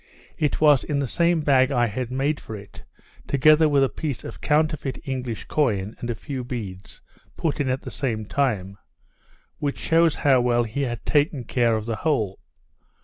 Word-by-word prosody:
It 150 - 0
was 150 -4 +5
in 145 - -2
the 140 - 0
same 170 +5 +1
bag 135 -3 +4
I 120 -3 +3
had 120 +2 -3
made 140 +4 -1
for 110 - -8
it, 100 -1 -12 0.4
together 155 +3 +5
with 140 -2 +4
a - - +4
piece 145 -1 -5
of - - -9
counterfeit 155 -3 0
English 125 -4 -4
coin, 110 -8 0
and 120 - -5
a 120 - -1
few 130 +7 -5
beads, 105 -7 -7 0.4
put 160 -3 -1
in 140 -2 0
at 130 +1 -1
the 130 - -7
same 115 -4 -2
time; 100 -7 -1 0.8
which 145 -1 -2
shews 165 -1 +3
how 135 -3 +3
well 120 -1 +2
he 115 +5 -4
had 120 -5 -3
taken 145 -3 +1
care 120 -1 +1
of 110 -1 -3
the 115 -1 -3
whole. 110 -10 -1
130 Hz, 185 wpm, -24 LUFS, 115-145 Hz, 0.8 s, was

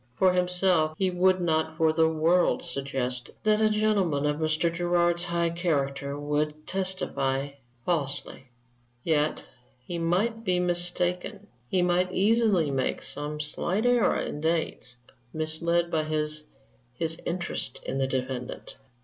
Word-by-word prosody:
For 185 -1 +4
himself, 180 -3 +2
he 190 -1 +1
would 185 +1 +3
not 160 -2 0
for 160 -1 +3
the 160 0 +3
world 165 +3 +2
suggest 130 -3 -3
that 215 0 +3
a 215 - +4
gentleman 205 -9 +1
of 150 0 +1
Mr. 155 +1 0
Gerard's 175 0 +1
high 170 -1 0
character 140 -5 -1
would 150 +1 -2
testify 145 -8 -1 0.4
falsely; 140 -5 -2 0.6
yet 155 -2 +1 0.4
he 175 -1 -4
might 205 +7 0
be 185 -4 +1
mistaken; 180 +3 -1 0.2
he 185 -1 +2
might 180 +1 +2
easily 200 -6 +3
make 130 -1 -1
some 150 +1 0
slight 175 +8 -1
error 245 -2 +3
in 150 - -4
dates, 160 -5 -1 0.4
misled 170 +2 0
by 155 -1 0
his 155 0 0 0.5
his 160 +3 -1
interest 175 0 -3
in 135 - -2
the 135 - +1
defendant. 130 -1 -4
170 Hz, 130 wpm, -27 LUFS, 150-180 Hz, 0.6 s, For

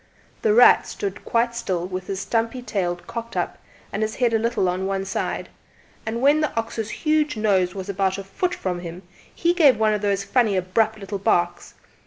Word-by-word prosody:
"The 215 -1 +3
Rat" 245 - +7
stood 195 -1 -5
quite 235 0 +1
still 185 -7 -2
with 185 0 -5
his 195 -1 -3
stumpy 230 +4 -1
tail 185 -7 -1
cocked 235 0 -6
up - - -2 0.3
and - - -2
his 215 0 -1
head 240 -2 +1
a 225 - +3
little 225 -4 +1
on 185 +2 -1
one 195 0 -2
side, 190 - -3 0.6
and 230 +3 -2
when 290 +3 +5
the 305 - +2
huge 230 +7 -1
ox's - - -10
nose 185 -3 +2
was 190 -1 -5
about 195 -1 0
a 195 - -5
foot 355 - -2
from 180 -2 -3
him 175 +1 -8 0.3
he 345 +1 +1
gave 295 - +5
one 215 0 +3
of 210 - -1
those 200 -1 0
funny 210 -1 +2
abrupt 215 +4 +1
little 200 -1 -5
barks. 175 -4 0
210 Hz, 200 wpm, -23 LUFS, 190-235 Hz, 0.6 s, Rat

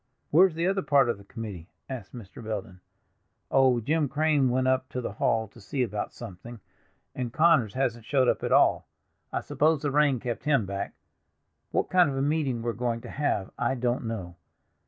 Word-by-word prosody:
"Where 180 +6 +7
is 170 - -9
the 165 +1 0
other 195 +1 +1
part 140 -7 +3
of 115 - -1
the - - -13
committee?" 100 -5 -8 0.2
asked 125 -8 -7
Mr. 115 0 -10
Belden. 100 -4 -5 0.7
"Oh, 130 -2 +4
Jim 150 +5 0
Crane 150 -2 +2
went 130 +1 +1
up 130 0 +1
to 125 - -4
the 120 - -4
hall 110 +1 0
to 115 - -16
see 125 +7 -1
about 105 -3 -3
something, 115 +1 -10 0.5
and 125 -2 -4
Connors 155 -8 +3
hasn't 120 -4 -1
showed 130 -2 +2
up - - +2
at - - -2
all; - - +4 0.4
I - - -1
suppose 155 0 +1
the 145 - 0
rain 145 -3 +3
kept 120 +3 -4
him 140 -8 +3
back. 100 +1 -4 0.7
What - - -1
kind 180 -4 +5
of 135 - -3
a - - 0
meeting 140 -6 0
we're 120 0 -1
going 120 -1 -2
to - - -9
have 135 -9 -1
I 135 - +1
don't 120 -1 -1
know. 90 -6 -5
125 Hz, 200 wpm, -27 LUFS, 115-145 Hz, 0.7 s, Where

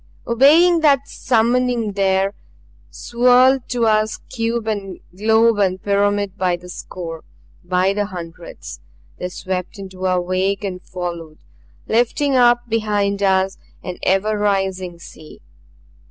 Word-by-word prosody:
Obeying 310 +9 +5
that 285 -3 +3
summoning 240 -1 0
there 195 0 +1 0.6
swirled 250 - +3
to 240 -2 0
us 215 0 +1
cube 230 -2 -2
and 200 -4 -4 0.2
globe 220 +2 +3
and 190 -2 0
pyramid 205 -1 0
by 180 -1 +1
the 180 +1 -13
score 165 -2 -8 0.4
by 180 +2 +1
the 205 0 -1
hundreds. 170 -3 -9 0.4
They 180 - -4
swept 185 +2 -5
into 190 -1 -5
our 185 -1 +1
wake 185 +3 -1
and 185 -2 -4
followed 170 -4 -7 0.5
lifting 255 +5 +1
up 240 -1 +4
behind 205 -3 -1
us, 190 -1 +1 0.2
an 180 -1 -6
ever 205 +3 +1
rising 190 -3 -1
sea. 155 -2 -14
200 Hz, 125 wpm, -19 LUFS, 185-230 Hz, 0.6 s, Obeying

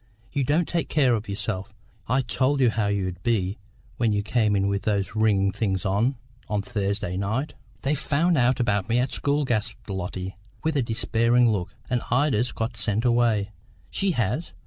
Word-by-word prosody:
You 140 -1 0
don't 155 +6 +2
take 170 -5 -1
care 135 -5 +3
of 110 -2 -2
yourself: 100 -1 -3 0.3
I 125 +3 +2
told 130 +3 +1
you 125 -3 +4
how 110 -2 0
it 100 -2 0
'ud 90 0 -6
be 105 -4 0 0.4
when 115 -2 +2
you 105 0 0
came 105 -1 +2
in 100 0 +2
with 100 0 0
those 100 -3 -1
wringin' 105 -3 +3
things 95 -2 -1
on, 105 +8 +2 0.3
on 105 -2 0
Thursday 100 -5 -2
night." 110 +10 -1 0.3
"They've 140 +2 +1
found 165 +4 +2
out 125 -1 +3
about 105 -5 +1
me 115 - +3
at 125 +1 +1
the - - -10
school," 145 +1 +1
gasped 115 -2 -2
Lotty, 95 0 -4 0.3
with 160 -1 0
a 140 - +3
despairing 115 +1 +2
look, 95 -5 -3
"and 125 -2 0
Ida's 125 -2 +2
got 115 +2 -3
sent 110 +2 +1
away." 115 -4 +2 0.4
"She 195 -2 +1
has? 120 - -1
115 Hz, 190 wpm, -25 LUFS, 100-125 Hz, 0.4 s, you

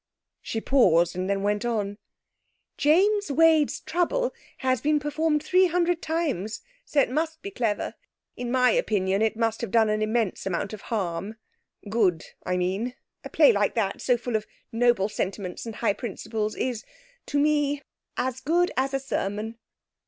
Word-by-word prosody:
She 225 - -3
paused, 175 -10 +3
and 185 +1 -2
then 200 0 0
went 205 +1 0
on 210 -3 -2 0.8
'James 390 +5 +3
Wade's 315 0 +4
Trouble - - 0 0.3
has 255 -3 +2
been 300 0 +2
performed 300 +1 0
three 370 +3 +4
hundred 345 0 +1
times, 295 - -2 0.2
so 295 - +1
it - - 0
must 320 +3 -2
be 400 - -5
clever. 230 - -1 0.4
In 245 0 -4
my 250 -1 +4
opinion, 195 -2 +1
it 220 0 +1
must 225 -1 0
have 235 - -3
done 220 0 +3
an 215 0 0
immense 215 -3 0
amount 190 +3 -2
of 210 - -7
harm 195 -1 -2 0.5
good, 200 -6 +1 0.2
I 180 - -1
mean. 195 +8 -1 0.3
A - - -7
play - - +6
like - - +1
that, - - -1
so 250 -2 +2
full 240 0 -4
of 215 -1 -1 0.2
noble 235 -4 +3
sentiments 195 0 -4
and 225 - -6
high 225 -2 +1
principles, 215 -1 -4
is 245 -4 -2 0.4
to 290 - -1
me 290 -1 +2 0.3
as 260 0 -1
good 340 +6 +2
as 270 +1 0
a - - +1
sermon!' 220 -3 -3
240 Hz, 165 wpm, -26 LUFS, 210-295 Hz, 0.8 s, play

